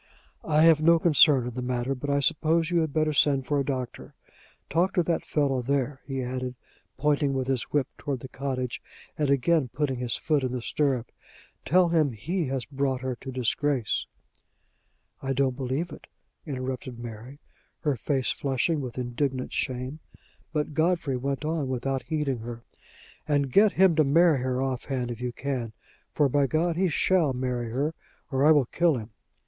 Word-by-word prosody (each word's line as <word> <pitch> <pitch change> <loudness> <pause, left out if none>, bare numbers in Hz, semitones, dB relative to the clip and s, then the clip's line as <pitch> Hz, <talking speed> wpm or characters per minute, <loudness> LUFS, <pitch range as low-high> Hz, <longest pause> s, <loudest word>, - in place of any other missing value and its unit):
"I 155 0 +3
have 165 -2 +6
no 170 +2 +6
concern 150 -6 +5
in 125 - -5
the 125 - -4
matter, 125 +1 -1
but 135 +2 -5
I 140 0 +2
suppose 165 +2 +2
you 175 - +3
had 160 -2 0
better 155 0 +1
send 140 -2 +3
for 145 +1 +1
a - - +1
doctor. 130 -3 -5 0.5
Talk 180 +5 +1
to 175 - +3
that 165 0 -1
fellow 140 -4 +1
there," 135 +1 -1
he 135 -2 -3
added, 125 0 -4 0.4
pointing 145 -1 +1
with 130 -1 -1
his 130 -2 0
whip 145 -3 0
toward 140 -4 -3
the - - -7
cottage, 130 -2 -3 0.3
and 150 -2 0
again 140 +2 +3
putting 135 +1 -2
his 120 -2 -1
foot 150 -4 0
in 130 -1 -1
the 125 - -3
stirrup. 130 -5 0 0.5
"Tell 180 +1 +4
him 155 -6 +2
he 165 - -2
has 130 -1 -2
brought 135 -2 -1
her 130 -1 -2
to 135 - -8
disgrace 130 0 0 0.6
" - - -44
"I 135 0 -1
don't 135 -1 +1
believe 135 +6 -2
it," - - -11 0.4
interrupted 130 -2 -4
Mary, 120 +3 -8 0.4
her 150 -4 +1
face 130 +1 0
flushing 140 +3 0
with 125 -2 -6
indignant 130 +1 -2
shame. 130 +3 -2 0.5
But 150 -1 -2
Godfrey 160 -3 +1
went 140 +3 -2
on 155 -3 -1
without 130 +1 -2
heeding 150 -6 -2
her: 115 +1 -7 0.6
"And 140 -3 +1
get 205 +5 +5
him 190 -2 +5
to 155 - +6
marry 155 +1 +4
her 130 +1 -1
off 130 -2 -3
hand, 125 -3 -2
if 120 0 -7
you 125 0 -2
can 125 -3 -4 0.4
for, 145 - +3
by 140 +1 +2
God! 165 +4 +1
he 185 +1 +2
shall 165 -2 +2
marry 125 -2 -2
her, 140 +7 -1 0.4
or 135 0 +1
I 150 - +6
will 145 -4 +5
kill 165 +3 +2
him." 110 -1 -8
135 Hz, 185 wpm, -27 LUFS, 125-155 Hz, 0.6 s, have